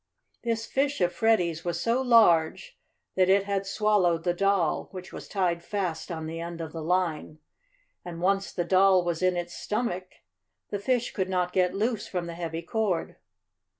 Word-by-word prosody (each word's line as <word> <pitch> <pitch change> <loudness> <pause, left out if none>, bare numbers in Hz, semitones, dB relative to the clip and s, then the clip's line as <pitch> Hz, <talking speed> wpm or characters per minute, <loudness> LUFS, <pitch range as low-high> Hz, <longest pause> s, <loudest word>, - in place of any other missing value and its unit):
This 230 -1 -1
fish 280 +4 0
of 175 -1 +1
Freddie's 175 -8 +1
was 175 -1 -2
so 235 +6 +1
large 230 - +4 0.4
that 185 0 +3
it 195 +1 +5
had 200 -1 -2
swallowed 195 -5 +2
the 175 - +1
doll, 195 -3 +1
which 185 0 -9
was - - -8
tied 175 -4 -1
fast 185 -3 -3
on 160 -1 -4
the 165 +1 -5
end 170 0 -6
of 160 -1 -5
the 165 - -6
line, 165 -2 -1 0.7
and 170 -1 -7
once 195 +2 +1
the 175 - -2
doll 185 0 +4
was 170 -1 -2
in 185 -1 +2
its 175 0 -4
stomach 185 -5 -3 0.6
the 205 - -2
fish 245 +3 0
could 190 -1 -2
not 180 -1 0
get 180 -1 +2
loose 220 +1 -1
from 180 -2 -3
the 170 - -6
heavy 165 -1 -5
cord. 200 -2 -1
185 Hz, 180 wpm, -27 LUFS, 170-205 Hz, 0.7 s, it